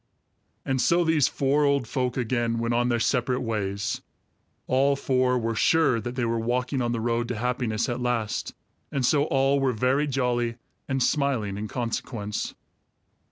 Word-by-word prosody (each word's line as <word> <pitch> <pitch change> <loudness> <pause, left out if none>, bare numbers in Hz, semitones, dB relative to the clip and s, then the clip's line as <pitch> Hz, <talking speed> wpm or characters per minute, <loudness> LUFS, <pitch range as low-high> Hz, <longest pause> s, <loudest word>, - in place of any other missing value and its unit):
And 130 -1 0
so 175 +4 +3
these 160 -4 +3
four 140 +2 +1
old 140 -4 +2
folk 125 0 -1
again 120 -1 0
went 115 +1 -1
on 120 +1 +2
their 120 -1 +1
separate 125 +1 +1
ways. 105 -2 -2 0.6
All 135 +2 +3
four 130 -2 +1
were 115 -1 -1
sure 135 -1 +3
that 120 +2 -5
they 125 -2 0
were 115 0 0
walking 125 +3 -1
on 120 -1 0
the 115 - -1
road 120 +1 0
to 120 - -3
happiness 120 -1 -1
at 125 -1 -3
last, 120 -4 -2 0.4
and 135 -2 0
so 145 +2 +3
all 135 -1 +2
were 135 -2 +1
very 130 +6 +1
jolly 120 -3 0 0.3
and 135 -2 0
smiling 130 -10 0
in 105 +2 -4
consequence. 110 -2 -3
125 Hz, 165 wpm, -26 LUFS, 115-135 Hz, 0.6 s, so